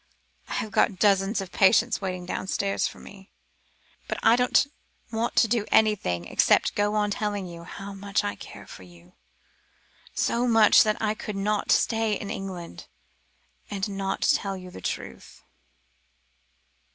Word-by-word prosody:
"I - - -4
have 215 - -3
got 215 -3 +2
dozens 195 +1 +2
of 190 -1 -8
patients 225 +4 +3
waiting 185 -2 -4
downstairs 195 +2 -1
for - - -10
me, 195 -1 -14 0.8
but - - -3
I 230 - +6
don't 250 +2 +3 0.5
want 225 +1 -2
to 230 - +5
do 225 -1 0
anything 185 - +2
except - - +2
go 205 +1 0
on 210 -1 +1
telling 205 -2 -2
you 170 -1 -10
how 200 +2 -8
much 200 0 -2
I 100 - -2
care 100 - -11
for - - -12
you, 90 -1 -17 1.0
so 240 +1 +1
much 225 -3 +6
that 215 -1 +1
I 215 -1 0
could 210 -1 -6
not 205 +1 -1
stay 225 -2 +2
in 200 - -6
England, 180 - -7 0.8
and 195 0 -2
not 195 -1 -3
tell 200 -10 +1
you 185 -1 -10
the 95 - -10
truth." 65 -6 -6
200 Hz, 150 wpm, -26 LUFS, 190-215 Hz, 1.0 s, I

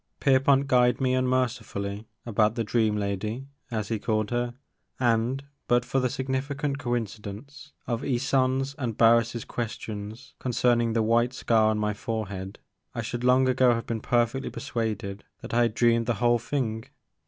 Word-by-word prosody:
Pierpont 135 0 +4
guyed 125 -2 +3
me 130 -1 +1
unmercifully 120 -5 -1 0.2
about 110 -1 +2
the 115 - 0
dream 110 -1 +1
lady'* 105 +5 -3 0.2
as 110 -4 -3
he 110 -2 -1
called 110 0 -1
her, 120 0 -1 0.4
and, 120 +3 +1 0.2
but 120 0 +3
for 135 +2 0
the 125 -1 +1
significant 135 +2 -2
coincidence 120 +3 -5
of 120 -2 -2
Ysonde's 135 +1 +1
and 120 -5 -2
Har 115 0 +7
ris' 115 0 -4
questions 110 +1 -6
concerning 120 -2 +2
the 115 -1 +2
white 120 +3 +2
scar 110 -3 +3
on 110 - +1
my 105 0 0
forehead, 100 -3 -4 0.4
I - - -2
should 120 0 -4
long 130 +1 +4
ago 130 -1 +4
have 115 - -4
been 115 -2 -3
perfectly 120 +3 +1
persuaded 110 -7 -3 0.2
that - - -8
I 120 - +4
had 115 -2 +1
dreamed 115 -1 +3
the 120 - +1
whole 120 +2 +3
thing. 115 -3 -2
120 Hz, 160 wpm, -27 LUFS, 110-130 Hz, 0.4 s, Har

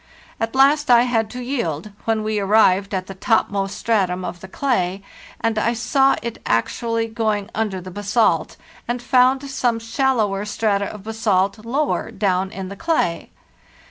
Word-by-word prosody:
At 225 +2 -2
last 285 +2 +4
I 240 -1 +7
had 225 -3 0
to 250 +2 -6
yield, 215 - -3
when 225 -1 0
we 215 -1 -1
arrived 200 -1 +3
at 185 -1 -2
the 195 - -8
topmost 195 -1 0
stratum 185 -5 0
of 175 - -6
the 190 - -10
clay 195 -5 -1 0.4
and 225 -1 0
I 230 +2 +1
saw 270 +3 +2
it 235 -1 -5
actually 230 - 0
going 220 -3 -2
under 215 -4 -2
the 185 +1 -9
basalt, 205 +4 +1 0.3
and 240 +1 -1
found 260 +2 +3
some 250 -4 0
shallower 225 -4 0
strata 205 -1 0
of 200 0 -8
basalt 210 -2 0
lower 275 +6 -1
down 190 -1 0
in 190 -1 -7
the 200 - -7
clay. 255 - -1
220 Hz, 160 wpm, -21 LUFS, 195-240 Hz, 0.4 s, I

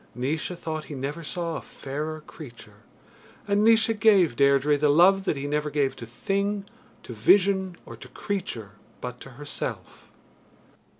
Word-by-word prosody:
Naois 140 +6 -2
thought 155 -2 -5
he 145 - -8
never 140 +5 -4
saw 165 +1 -3
a - - -7
fairer 155 +3 -6
creature, 120 -9 -12 0.7
and 205 +1 +2
Naois 225 0 +5
gave 195 - +5
Deirdre 140 +2 +4
the 145 +1 +2
love 190 +6 +5
that 155 - 0
he 140 - -4
never 150 +1 -1
gave 140 -2 0
to 115 - -8
thing, 200 - -2 0.4
to 120 - -8
vision, 190 - +3
or - - -9
to - - -12
creature 180 - -5 0.3
but 125 0 -6
to - - -10
herself. 145 +3 -7
155 Hz, 155 wpm, -26 LUFS, 135-190 Hz, 0.7 s, Naois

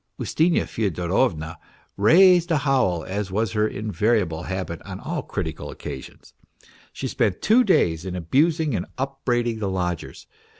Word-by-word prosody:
Ustinya 165 +2 +1
Fyodorovna 90 -4 -1 0.4
raised 175 - +5
a 160 - +3
howl, 130 - +1
as 100 +1 -3
was 105 +2 -1
her 105 +1 +1
invariable 105 -5 0
habit 90 -3 -4
on - - -8
all - - -3
critical 80 - -5
occa 65 - -7
sions. - - -15 0.6
She - - -5
spent 95 - 0
two 235 +4 +5
days 85 - +2
in 95 -1 -5
abusing 150 - +1
and 90 -5 -2
upbraiding 120 -4 -1
the 100 -2 -2
lodgers. 90 -3 -4
105 Hz, 140 wpm, -23 LUFS, 90-135 Hz, 0.6 s, raised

